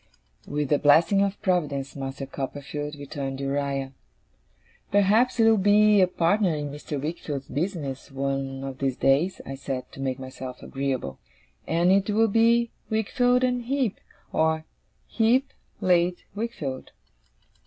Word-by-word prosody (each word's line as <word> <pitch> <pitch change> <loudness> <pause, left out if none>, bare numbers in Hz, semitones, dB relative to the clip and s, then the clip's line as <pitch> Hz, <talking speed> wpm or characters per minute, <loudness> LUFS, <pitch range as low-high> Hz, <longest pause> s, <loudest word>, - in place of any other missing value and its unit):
'With 145 -1 -2
the 145 - +3
blessing 165 +7 +5
of 200 0 0
Providence, 145 -7 0
Master 135 0 -5
Copperfield,' 145 +2 -5
returned 140 -1 -5
Uriah. 140 -1 -2 1.0
'Perhaps 205 +6 +3
you'll 225 -1 +5
be 205 +1 +5
a 185 - +5
partner 180 0 +2
in 145 -1 -4
Mr. 145 0 -5
Wickfield's 145 -2 -4
business, 145 -4 -3
one 135 0 -3
of 135 -1 -6
these 135 -2 -1
days,' 145 +8 +2
I 135 - -6
said, 135 -1 -5
to - - -12
make 130 -1 -1
myself 130 -1 -8
agreeable; 130 - -3 0.5
'and 170 +3 +3
it 195 +1 +3
will 220 +2 +3
be 230 +2 +3 0.2
Wickfield 245 +3 +2
and 250 -1 0
Heep, 260 -5 0 0.3
or 160 0 +1 0.4
Heep 245 +4 +2 0.3
late 175 -1 +2
Wickfield. 195 - -5
155 Hz, 130 wpm, -26 LUFS, 135-205 Hz, 1.0 s, blessing